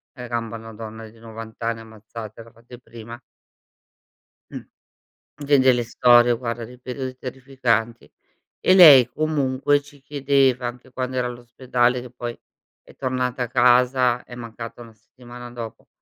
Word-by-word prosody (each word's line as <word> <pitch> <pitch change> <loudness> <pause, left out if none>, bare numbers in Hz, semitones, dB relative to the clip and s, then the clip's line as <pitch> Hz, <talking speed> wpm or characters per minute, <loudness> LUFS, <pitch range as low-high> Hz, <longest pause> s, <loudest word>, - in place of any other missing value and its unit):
1 125 -2 -8
gamba 115 -1 -4
a - - -11
donna 110 0 -9
di 115 +1 -20
90 115 0 -11
anni, 115 0 -2
ammazzatela, 110 0 -11
fate 120 +1 -15
prima. 115 0 -11 1.3
Mh. - - -7 0.8
Vedi 135 -2 +5
le 120 - -1
storie, 120 +1 +5
guarda, 115 -1 -5
dei 125 +2 -13
periodi 130 0 -6
terrificanti. 125 -3 -2 0.5
E 185 - +4
lei 145 -9 +9
comunque 145 -1 0
ci 145 -1 -18
chiedeva, 135 -3 +1
anche 125 +2 -8
quando 130 0 -4
era 125 - 0
all'ospedale, 125 0 -1
che 125 -1 -11
poi 120 -1 -7 0.4
è - - -18
tornata 125 0 -2
a - - -7
casa, 125 0 +3
è 120 - -12
mancata 115 0 -9
1 115 -1 -14
settimana 120 +2 -13
dopo; 115 -2 -9
120 Hz, 140 wpm, -22 LUFS, 115-130 Hz, 1.3 s, lei